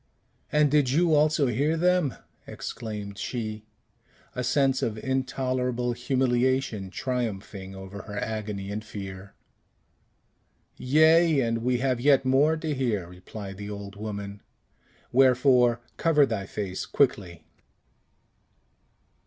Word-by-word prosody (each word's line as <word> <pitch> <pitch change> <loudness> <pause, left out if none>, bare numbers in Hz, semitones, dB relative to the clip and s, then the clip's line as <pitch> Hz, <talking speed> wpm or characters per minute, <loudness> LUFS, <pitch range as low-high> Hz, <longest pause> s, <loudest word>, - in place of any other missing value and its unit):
"And 150 -2 +3
did 145 -4 +3
you 165 +4 +3
also 150 -1 +3
hear 140 +7 +1
them?" 180 -5 +2 0.3
exclaimed 105 -3 -6
she, 110 -3 -4 0.7
a 125 - -3
sense 135 +1 +2
of 110 -1 -2
intolerable 130 -1 -1
humiliation 125 -3 0
triumphing 100 -5 -4
over 95 +1 -8
her 105 -1 -8
agony 105 -2 -4
and 105 +1 -4
fear. 95 -2 -8 1.4
"Yea; 155 +2 +4
and 115 -1 0
we 125 +2 +1
have 130 -1 0
yet 135 0 +4
more 145 +5 +3
to 155 -1 -2
hear," 115 -10 -1
replied 95 +2 -9
the 105 0 -7
old 100 -1 -7
woman. 100 -1 -6 0.7
"Wherefore, 125 -2 +4 0.2
cover 150 -3 +4
thy 110 -6 -3
face 95 -3 -4
quickly." 100 -11 0
120 Hz, 110 wpm, -26 LUFS, 105-135 Hz, 1.4 s, Yea